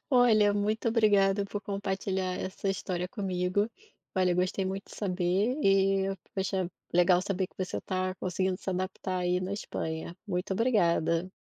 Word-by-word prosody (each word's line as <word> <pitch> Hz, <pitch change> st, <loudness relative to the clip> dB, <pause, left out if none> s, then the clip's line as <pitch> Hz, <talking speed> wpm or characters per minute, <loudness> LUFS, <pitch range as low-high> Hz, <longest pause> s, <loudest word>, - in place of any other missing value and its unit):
Olha, 225 Hz, -5 st, +5 dB
muito 210 Hz, +3 st, 0 dB
obrigado 205 Hz, -3 st, +3 dB
por 205 Hz, +1 st, -4 dB
compartilhar 190 Hz, -2 st, -2 dB
essa 190 Hz, +1 st, -3 dB
história 180 Hz, -1 st, -2 dB
comigo. 190 Hz, 0 st, 0 dB, 0.5 s
Olha, 185 Hz, -2 st, +3 dB
gostei 185 Hz, +2 st, 0 dB
muito 195 Hz, +1 st, -4 dB
de -, -, -10 dB
saber 190 Hz, +5 st, +1 dB
e, 195 Hz, 0 st, +3 dB, 0.2 s
poxa, 190 Hz, -2 st, -1 dB, 0.2 s
legal 180 Hz, +1 st, +5 dB
saber 190 Hz, -1 st, -1 dB
que -, -, -33 dB
você 185 Hz, -1 st, -2 dB
tá 185 Hz, 0 st, -2 dB
conseguindo 185 Hz, 0 st, -1 dB
se -, -, -8 dB
adaptar 185 Hz, 0 st, -2 dB
aí 180 Hz, 0 st, +1 dB
na 185 Hz, +1 st, -3 dB
Espanha. 160 Hz, -5 st, -4 dB
Muito 185 Hz, -1 st, -2 dB
obrigada. 185 Hz, -6 st, +2 dB
190 Hz, 145 wpm, -29 LUFS, 180-200 Hz, 0.5 s, Olha